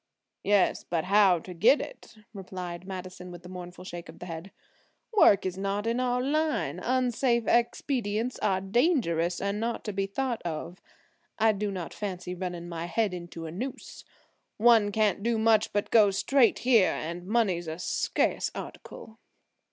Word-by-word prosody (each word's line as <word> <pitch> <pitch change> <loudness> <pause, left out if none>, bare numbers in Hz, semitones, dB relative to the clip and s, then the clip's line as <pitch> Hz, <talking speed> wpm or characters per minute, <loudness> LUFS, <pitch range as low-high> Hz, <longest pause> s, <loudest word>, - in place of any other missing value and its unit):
"Yes, 205 -2 +2
but 165 -2 -2
how 195 -1 +5
to 180 +2 -9
get 230 - +5
it," - - -9 0.2
replied 185 -2 -7
Madison 185 -1 -7
with 175 0 -11
a - - -9
mournful 180 0 -9
shake 175 -2 -8
of 160 - -11
the - - -8
head. 165 +2 -7 0.7
"Work 200 - +6
is 185 0 -3
not 200 +2 -2
in 230 +2 0
our 250 0 0
line, 305 +3 0
unsafe 245 -1 +1
expedients 240 -1 0
are 190 -2 +1
dangerous 195 - +1
and 200 +1 -2
not 230 +1 -2
to 210 - -4
be 195 0 -1
thought 245 +3 -2
of. 170 +2 -5 0.6
I 220 0 +4
do 210 0 -2
not 185 -4 -5
fancy 180 -3 -5
running 175 -1 -5
my 170 -1 -5
head 210 +2 0
into 170 -2 -7
a 160 - -6
noose. 245 +10 -7 0.5
One 225 -2 +5
can't 210 -1 +1
do 230 +1 +1
much 220 -1 +3
but 205 0 -1
go 215 -3 +6
straight 225 +6 +3
here, 230 -7 +5
and 170 +3 -5
money's 195 -6 +1
a 160 0 -4
scarce 180 - 0
article." 220 0 -9
200 Hz, 165 wpm, -28 LUFS, 180-230 Hz, 0.7 s, Work